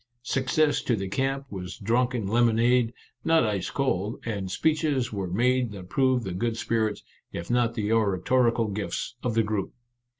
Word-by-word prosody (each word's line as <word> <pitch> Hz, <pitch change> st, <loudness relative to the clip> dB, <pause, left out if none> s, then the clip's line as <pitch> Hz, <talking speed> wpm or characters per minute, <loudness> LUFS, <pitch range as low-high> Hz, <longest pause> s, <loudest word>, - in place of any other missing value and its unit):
Success 145 Hz, +4 st, +1 dB
to 120 Hz, -, +1 dB
the 95 Hz, -2 st, -3 dB
camp 135 Hz, +6 st, -1 dB
was 90 Hz, -2 st, -6 dB
drunk 120 Hz, +4 st, +1 dB
in 110 Hz, -4 st, -2 dB
lemonade 120 Hz, +2 st, +3 dB, 0.2 s
— -, -, -44 dB
not 165 Hz, -4 st, +4 dB
ice 100 Hz, -4 st, -1 dB
cold 110 Hz, -6 st, -1 dB
— -, -, -15 dB
and 100 Hz, -5 st, -3 dB
speeches 145 Hz, -, 0 dB
were 100 Hz, -2 st, -2 dB
made 125 Hz, +5 st, +2 dB
that 90 Hz, -3 st, -9 dB
proved 130 Hz, -2 st, +2 dB
the 95 Hz, -3 st, -4 dB
good 115 Hz, +4 st, -1 dB
spirits, 110 Hz, -2 st, -1 dB, 0.3 s
if 85 Hz, +5 st, -5 dB
not 120 Hz, -1 st, +2 dB
the 105 Hz, -1 st, -1 dB
oratorical 115 Hz, +2 st, +2 dB
gifts, 105 Hz, +4 st, -3 dB
of 120 Hz, -3 st, -1 dB
the 115 Hz, -, +4 dB
group. 105 Hz, -2 st, -3 dB
115 Hz, 175 wpm, -26 LUFS, 105-125 Hz, 0.3 s, not